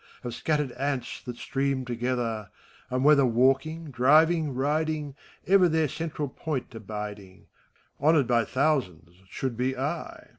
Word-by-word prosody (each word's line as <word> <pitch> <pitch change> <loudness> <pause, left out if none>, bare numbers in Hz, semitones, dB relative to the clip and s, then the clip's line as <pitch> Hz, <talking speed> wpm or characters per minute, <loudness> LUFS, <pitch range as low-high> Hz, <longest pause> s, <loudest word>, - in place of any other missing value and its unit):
Of 120 -1 -4
scattered 150 0 -1
ants 135 +1 -3
that 125 -1 -5
stream 135 -1 -1
together: 120 -3 -2 0.4
And 130 +1 -1
whether 150 -1 +6
walking^ 135 +6 +1
driving, 155 +5 +4
riding, 150 +2 -1 0.3
Ever 185 -1 +5
their 160 -1 +2
central 155 0 -4
point 135 -1 -5
abiding. 105 -3 -7 0.5
Honored 150 -1 +4
by 120 -1 +2
thousands, 95 - -1
should 130 -3 -3
be 130 +2 -1
I. 145 +6 -4
135 Hz, 125 wpm, -27 LUFS, 120-155 Hz, 0.5 s, whether